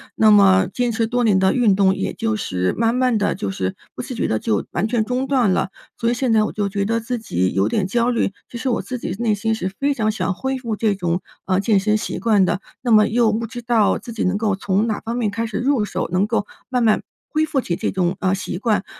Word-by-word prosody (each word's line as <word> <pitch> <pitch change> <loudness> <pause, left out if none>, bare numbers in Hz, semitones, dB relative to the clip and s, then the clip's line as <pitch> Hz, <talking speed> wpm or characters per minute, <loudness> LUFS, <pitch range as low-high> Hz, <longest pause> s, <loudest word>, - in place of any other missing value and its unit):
那 215 -1 +5
么 190 -2 +6
坚 245 -2 0
持 225 +1 +1
多 245 0 0
年 205 -4 +4
的 190 0 +3
运 230 -6 +3
动 190 -1 +4
也 - - -3
就 225 -1 -1
是 90 - -1
慢 230 +1 +2
慢 250 -3 +2
地 205 - 0
就 100 - -3
是 95 0 -3 0.2
不 - - -5
自 255 0 -6
觉 - - -1
地 110 - 0
就 105 -3 -1
完 195 +6 0
全 230 -1 +1
中 250 +3 -2
断 255 -8 +2
了， 190 +1 0 0.3
所 230 - 0
以 - - +2
现 245 0 0
在 215 -1 +4
我 - - -3
就 205 -2 -1
觉 200 0 -1
得 230 +2 0
自 245 +2 -3
己 95 - -1
有 95 +1 +2
点 190 - 0
焦 235 +5 +1
虑， 230 -5 0 0.2
其 240 - -7
实 255 +3 -2
我 240 - 0
自 255 - -5
己 205 - -4
内 225 -3 +1
心 225 +2 -1
是 220 - -2
非 280 +1 +1
常 215 -4 0
想 210 -3 -1
恢 265 +6 -3
复 230 -5 -4
这 215 -3 +1
种， 175 -1 -1 0.2
呃， 185 0 +1
健 200 -1 +2
身 215 +1 +2
习 215 - -4
惯 210 -4 +3
的， 185 +2 -1 0.2
那 245 - -1
么 215 -1 +6
又 225 -1 +2
不 230 +1 -1
知 240 +2 -7
道 230 -3 +2
自 235 - -9
己 225 - -2
能 185 +2 +1
够 210 -3 0
从 200 +3 0
哪 215 - -2
方 230 +2 -4
面 230 -4 0
开 225 +3 -2
始 220 -3 -4
入 260 -3 +1
手， 185 -2 -3
能 185 +2 +3
够 220 -3 -1 0.2
慢 250 -2 0
慢 220 -2 +3 0.2
恢 310 0 +1
复 305 -3 -1
起 175 -8 -2
这 - - -2
种， 185 -1 0
呃， 190 0 +2
习 195 -2 -3
惯， 215 -1 0
220 Hz, 290 characters per minute, -21 LUFS, 195-235 Hz, 0.3 s, 么